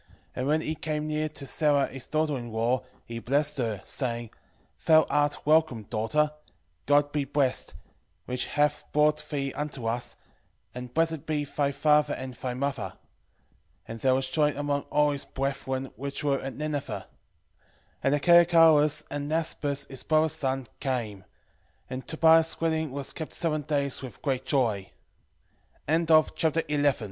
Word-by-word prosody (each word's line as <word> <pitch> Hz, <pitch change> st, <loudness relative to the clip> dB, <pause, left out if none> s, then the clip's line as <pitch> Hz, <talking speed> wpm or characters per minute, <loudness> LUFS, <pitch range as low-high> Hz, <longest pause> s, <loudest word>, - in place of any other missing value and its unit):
And 130 Hz, -, -2 dB
when 155 Hz, +2 st, +2 dB
he 155 Hz, -, -2 dB
came 150 Hz, -1 st, -3 dB
near 155 Hz, 0 st, -1 dB
to 145 Hz, -2 st, -7 dB
Sara 145 Hz, 0 st, +2 dB
his 135 Hz, -2 st, -8 dB
daughter 155 Hz, -1 st, 0 dB
in 120 Hz, -3 st, -6 dB
law, 115 Hz, +3 st, +1 dB, 0.2 s
he 115 Hz, 0 st, -6 dB
blessed 145 Hz, +4 st, 0 dB
her, 110 Hz, -5 st, -2 dB
saying, 120 Hz, -4 st, -2 dB, 0.6 s
Thou 160 Hz, -1 st, +7 dB
art 145 Hz, 0 st, +1 dB
welcome, 155 Hz, -7 st, +3 dB
daughter: 115 Hz, +9 st, 0 dB, 0.6 s
God 145 Hz, 0 st, +4 dB
be 145 Hz, -1 st, 0 dB
blessed, 135 Hz, -2 st, -1 dB, 0.5 s
which 125 Hz, 0 st, -2 dB
hath 150 Hz, 0 st, +1 dB
brought 150 Hz, 0 st, +3 dB
thee 140 Hz, -2 st, -2 dB
unto 145 Hz, -5 st, -4 dB
us, 120 Hz, +2 st, -2 dB, 0.6 s
and 125 Hz, 0 st, -7 dB
blessed 160 Hz, 0 st, 0 dB
be 150 Hz, -2 st, -1 dB
thy 140 Hz, 0 st, -1 dB
father 150 Hz, +1 st, +3 dB
and 130 Hz, -1 st, -6 dB
thy 125 Hz, 0 st, -4 dB
mother. 140 Hz, 0 st, -3 dB, 0.9 s
And 115 Hz, -, -7 dB
there 130 Hz, +2 st, +3 dB
was 130 Hz, 0 st, 0 dB
joy 150 Hz, +1 st, +1 dB
among 145 Hz, -1 st, -1 dB
all 150 Hz, 0 st, +3 dB
his 140 Hz, -1 st, -3 dB
brethren 135 Hz, -1 st, -3 dB
which 140 Hz, +2 st, -5 dB
were 140 Hz, -2 st, +1 dB
at 135 Hz, -2 st, -6 dB
Nineve. 150 Hz, -1 st, -3 dB
11:18 -, -, -5 dB, 1.0 s
And 135 Hz, +1 st, +2 dB
Achiacharus, 160 Hz, -2 st, +5 dB
and 145 Hz, 0 st, -3 dB
Nasbas 145 Hz, -3 st, -1 dB
his 135 Hz, -, -6 dB
brother's 155 Hz, 0 st, +2 dB
son, 135 Hz, -4 st, -1 dB
came: 120 Hz, -7 st, -2 dB
11:19 95 Hz, -, -22 dB, 0.7 s
And 130 Hz, +1 st, -5 dB
Tobias' 160 Hz, 0 st, +4 dB
wedding 160 Hz, -2 st, 0 dB
was 140 Hz, 0 st, -4 dB
kept 160 Hz, -, -6 dB
seven 155 Hz, -3 st, 0 dB
days 140 Hz, -2 st, -1 dB
with 130 Hz, -3 st, -10 dB
great 135 Hz, -2 st, -1 dB
joy. 110 Hz, -9 st, +1 dB
145 Hz, 150 wpm, -27 LUFS, 130-150 Hz, 1.0 s, Thou